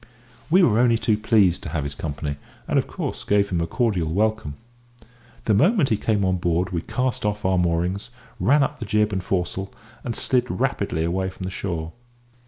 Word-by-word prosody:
We 185 +3 +5
were 115 -7 +4
only 120 -2 +4
too 110 -1 +1
pleased 105 -4 +3
to - - -6
have 75 -2 -2
his 70 0 -4
company, 75 -1 -4 0.3
and - - +3
of - - -2
course - - -5
gave 100 -1 +2
him 85 -2 0
a 85 - -1
cordial 90 -6 0
welcome. 110 -5 0 0.9
The 110 - +3
moment 165 - +4
he 110 - +3
came 105 -2 +1
on 95 0 +1
board 90 +1 0
we 85 -2 -1
cast 125 +6 -2
off 105 -1 -2
our 95 -1 +3
moorings, 90 +5 0 0.3
ran 140 +10 +4
up 145 +2 -3
the 115 - -4
jib 105 0 +1
and 95 -1 -2
foresail, 95 +1 -2 0.3
and 115 - -3
slid 125 -1 +1
rapidly 100 -10 -1
away 95 +3 -1
from 95 - -9
the 95 - -3
shore. 85 -4 -4
100 Hz, 195 wpm, -23 LUFS, 85-110 Hz, 0.9 s, We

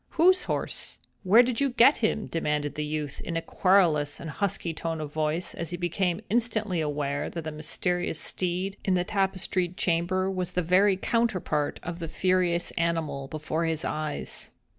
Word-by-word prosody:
"Whose 365 +3 +5
horse? - - -3 0.2
Where 215 +6 +7
did 245 +1 -1
you 280 - +3
get 250 +3 +6
him?" 220 -1 0
demanded 150 -3 -1
the 150 - -3
youth, 150 -2 -4
in 165 - -3
a - - 0
querulous 165 -7 +3
and 160 - -6
husky 175 -2 -1
tone 165 0 -3
of 150 -1 -6
voice, 155 +3 -1
as 170 - -5
he 175 - -4
became 175 +1 0
instantly 215 -5 0
aware 145 -2 -1
that 165 - -5
the 155 - -4
mysterious 160 +2 -2
steed 185 +4 -2
in 190 - +2
the 180 - +2
tapestried 190 -2 -1
chamber 180 +2 +1
was 185 -2 -3
the 180 - 0
very 185 +3 +4
counterpart 190 -9 0
of 175 0 -5
the 165 - -4
furious 175 +1 +1
animal 165 -5 -1
before 155 +3 -2
his 160 -1 -1
eyes. 155 -1 -3
175 Hz, 170 wpm, -27 LUFS, 155-190 Hz, 0.2 s, Where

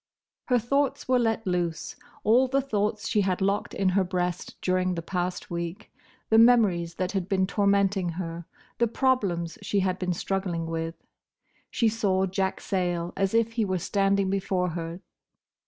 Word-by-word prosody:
Her 250 - +3
thoughts 275 +4 0
were 255 -1 +3
let 225 -1 0
loose: 175 -3 -2 0.3
all 245 +5 +4
the 270 +2 +1
thoughts 215 -4 -1
she 210 - +2
had 185 -2 0
locked 200 +1 0
in 195 -1 +2
her 190 +1 +2
breast 180 -1 -3
during 185 0 0
the 165 - -4
past 180 0 -3
week, 170 +4 -5 0.4
the 220 - +7
memories 200 -8 +4
that 185 0 -2
had 195 -2 -2
been 190 -2 +2
tormenting 200 -2 +2
her, 170 -2 -5 0.3
the 235 - +4
problems 205 -10 0
she 200 0 0
had 185 0 -1
been 180 -1 -1
struggling 180 -2 -2
with. 165 0 -3 0.7
She 230 - +1
saw 200 -4 +1
Jack 190 0 -2
Sayle 175 -2 -1
as 195 +2 0
if 230 0 +3
he 225 -1 0
were 185 -2 0
standing 195 +1 +1
before 185 -2 0
her. 165 +1 -5
190 Hz, 165 wpm, -27 LUFS, 180-215 Hz, 0.7 s, the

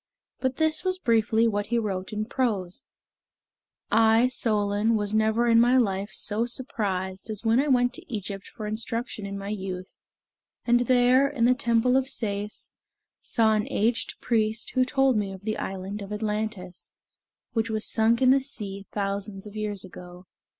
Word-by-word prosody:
But 260 -1 -1
this 315 +1 +1
was 370 -1 0
briefly 225 - +2
what 205 -2 -1
he 235 - 0
wrote 195 -4 -2
in 215 0 -2
prose: 205 -7 -2 1.0
"I, 225 +2 +5
Solon, 215 -2 +1
was 205 -1 -1
never 220 +2 +2
in 230 -1 +5
my 245 +2 +5
life 200 -4 +1
so 220 +3 0
surprised 200 -6 -3
as 215 0 -5
when 225 +2 +4
I 285 - +2
went 245 -2 +3
to - - -11
Egypt 200 -3 -5
for 215 - -8
instruction 220 0 -4
in 200 0 -5
my 200 0 -6
youth, 190 -3 -5 0.7
and 240 0 +4
there, 250 +2 +4
in 255 -5 +1
the 250 - +5
temple 250 -1 +2
of 265 0 0
Sais, 210 -4 -3 0.5
saw 220 -2 +2
an 215 -1 0
aged 230 +3 0
priest 220 -1 0
who 255 0 +2
told 270 -2 +2
me 200 -2 -1
of 190 -1 -9
the 215 0 -2
island 195 +2 -5
of 200 0 -8
Atlantis, 210 -4 -4 0.6
which 225 -1 0
was 215 -1 -2
sunk 230 +3 +2
in 255 - +6
the 270 - +5
sea 200 -7 -6
thousands 200 0 -3
of 210 0 -10
years 210 -3 -3
ago. 180 0 -12
220 Hz, 170 wpm, -26 LUFS, 200-240 Hz, 1.0 s, in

